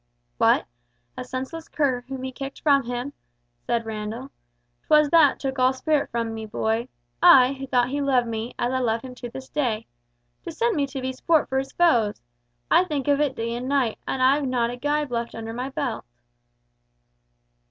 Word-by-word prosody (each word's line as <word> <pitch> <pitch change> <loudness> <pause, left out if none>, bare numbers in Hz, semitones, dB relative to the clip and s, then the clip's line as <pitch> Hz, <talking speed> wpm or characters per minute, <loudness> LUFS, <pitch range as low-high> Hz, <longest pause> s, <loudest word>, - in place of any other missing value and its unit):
"What? 230 +2 +4 0.5
A - - -5
senseless 265 +6 -6
cur 265 -5 0
whom 265 -1 -6
he 260 - -4
kicked 270 +1 -7
from 280 -4 +3
him," 245 +3 -4 0.5
said 230 - -2
Randall. 220 +4 -5 0.6
"'Twas 300 -1 +5
that 320 -5 +5
took 270 -1 -3
all 255 +1 +4
spirit 295 +2 0
from 230 -1 -2
me, 220 -1 -6
boy. 225 +3 -1 0.3
I, 255 0 +7
who 270 0 -7
thought 245 -1 +2
he 285 +2 -2
loved 260 -3 +2
me, 225 +1 -4
as 245 +2 -1
I 260 - +1
love 230 -2 0
him 255 -1 -8
to 245 -1 -8
this 260 +2 -9
day. 235 -7 -1 0.6
To - - -7
send 460 +7 0
me 285 -2 +1
to 270 -1 -6
be 260 0 -3
sport 315 +4 +1
for 265 - +1
his 270 0 -5
foes! 235 -12 +3 0.5
I 355 - +6
think 295 -6 -3
of 285 0 +3
it 280 -3 0
day 230 0 -3
and 245 +2 -4
night, 265 -6 +1
and 260 - -1
I've 275 +2 +3
not 240 -2 0
a - - -5
gibe 290 +2 -1
left 235 0 -3
under 225 0 -6
my 250 +3 -4
belt!" 250 -4 -3
260 Hz, 195 wpm, -24 LUFS, 235-280 Hz, 0.6 s, I